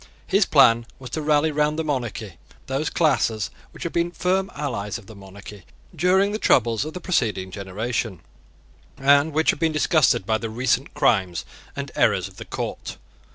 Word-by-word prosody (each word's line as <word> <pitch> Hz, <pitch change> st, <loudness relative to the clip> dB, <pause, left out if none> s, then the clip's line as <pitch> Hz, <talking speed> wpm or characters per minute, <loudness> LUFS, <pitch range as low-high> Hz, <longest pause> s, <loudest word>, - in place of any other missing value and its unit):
His -, -, +2 dB
plan 115 Hz, 0 st, +5 dB
was 130 Hz, -2 st, -10 dB
to 155 Hz, -, -2 dB
rally 150 Hz, +1 st, +2 dB
round 150 Hz, +1 st, +1 dB
the 160 Hz, -, -1 dB
monarchy 115 Hz, -, -4 dB, 0.3 s
those 135 Hz, +4 st, -2 dB
classes 125 Hz, -9 st, +1 dB, 0.2 s
which -, -, -10 dB
had 170 Hz, -, -4 dB
been 170 Hz, 0 st, +1 dB
the 175 Hz, -, -20 dB
firm 190 Hz, +2 st, 0 dB
allies 115 Hz, -9 st, -3 dB
of 115 Hz, -, -14 dB
the 110 Hz, -, -12 dB
monarchy 100 Hz, 0 st, -12 dB, 0.3 s
during 185 Hz, +5 st, +3 dB
the 215 Hz, -, -3 dB
troubles 115 Hz, -, +3 dB
of 155 Hz, -, -7 dB
the -, -, -4 dB
preceding 110 Hz, -, -1 dB
generation, 100 Hz, 0 st, -4 dB, 0.8 s
and 140 Hz, +3 st, +4 dB
which 160 Hz, +2 st, +3 dB
had -, -, -8 dB
been 165 Hz, -1 st, +2 dB
disgusted 155 Hz, -, +2 dB
by 110 Hz, +1 st, +1 dB
the 115 Hz, 0 st, -4 dB
recent 125 Hz, +4 st, -1 dB
crimes 95 Hz, -7 st, +1 dB, 0.3 s
and -, -, -5 dB
errors -, -, +2 dB
of -, -, -17 dB
the -, -, -8 dB
court. -, -, -5 dB
130 Hz, 180 wpm, -23 LUFS, 105-155 Hz, 0.8 s, plan